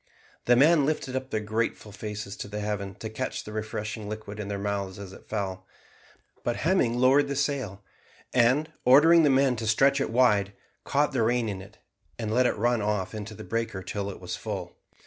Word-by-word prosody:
The 120 - +5
men 150 +4 +5
lifted 145 -4 -2
up 130 0 -3
their 110 -4 -1
grateful 110 0 -2
faces 105 0 -6
to 105 +1 -5
heaven 105 -2 -3
to 110 - -6
catch 110 +4 -4
the 105 - -9
refreshing 110 0 -4
liquid 110 -1 -7
in 105 - -4
their 100 0 -3
mouths 100 -1 -3
as 100 -2 -9
it - - -15
fell, 95 -3 -3 0.8
but 120 - 0
Hemming 150 -9 +1
lowered 135 +3 +4
the 140 - -3
sail, 130 -8 -2 0.5
and, 130 +6 +3
ordering 160 +6 +7
the 150 - +4
men 135 -1 +3
to 110 -1 -3
stretch 135 +5 +4
it - - -1
wide, 105 -5 +3 0.3
caught 145 +1 +2
the 130 - 0
rain 120 +1 +2
in 100 -3 -4
it, 100 +3 -14 0.4
and 110 -2 -3
let 125 +1 +4
it - - -1
run 120 +1 +1
off 105 -2 -1
into 110 0 -6
the - - -9
breaker 115 -4 -3
till 100 +2 -4
that 100 - -6
was - - -5
full. - - -5
110 Hz, 200 wpm, -27 LUFS, 105-130 Hz, 0.8 s, ordering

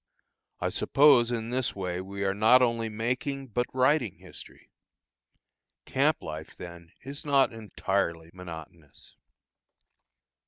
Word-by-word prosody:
I - - -1
suppose 135 -5 +4
in 115 -1 -3
this 130 0 -1
way 90 -2 -3
we 100 +1 -5
are 95 0 +1
not 110 +5 +5
only 115 -2 0
making, 125 +5 -3
but 120 +2 -1
writing 130 -4 +2
history. - - -14 1.1
Camp - - +1
life 80 0 -8
then 85 -1 -10
is 140 +3 -8
not 140 -5 +3
entirely 95 -6 -2
monotonous. 85 -4 -11
110 Hz, 115 wpm, -28 LUFS, 90-125 Hz, 1.1 s, not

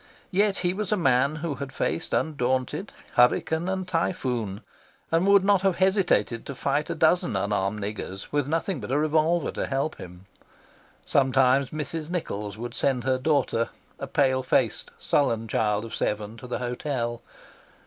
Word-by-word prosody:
Yet 200 +1 +2
he 175 - +2
was 210 0 -3
a 210 - +3
man 135 -2 +3
who 160 - -1
had 140 0 -6
faced 165 - -2
undaunted 135 +4 -1 0.2
hurricane 160 +7 +3
and 190 -1 -2
typhoon, 130 - -1 0.5
and 165 +4 +3
would 200 -1 +6
not 200 -2 +4
have 190 -2 +2
hesitated 185 - +2
to 140 - -5
fight 145 +4 -1
a 170 - -2
dozen 160 -6 +2
unarmed 100 +1 0
niggers 100 -1 -6
with 145 -2 0
nothing 165 +2 -1
but - - -7
a 135 - +2
revolver 155 +2 +2
to - - -3
help 140 +3 -1
him. 90 +1 -11 0.8
Sometimes 135 0 +3
Mrs. 155 +1 -5
Nichols 105 - -4
would 120 +2 -6
send 130 -3 0
her 130 -1 +1
daughter, 130 -5 +1 0.3
a - - -4
pale 130 -2 +2
faced, 130 - +1
sullen 115 -6 +1
child 105 0 0
of 115 - -9
seven, 105 +1 -2
to 125 - -9
the 125 - -2
hotel. 120 -1 -3
140 Hz, 160 wpm, -26 LUFS, 120-165 Hz, 0.8 s, would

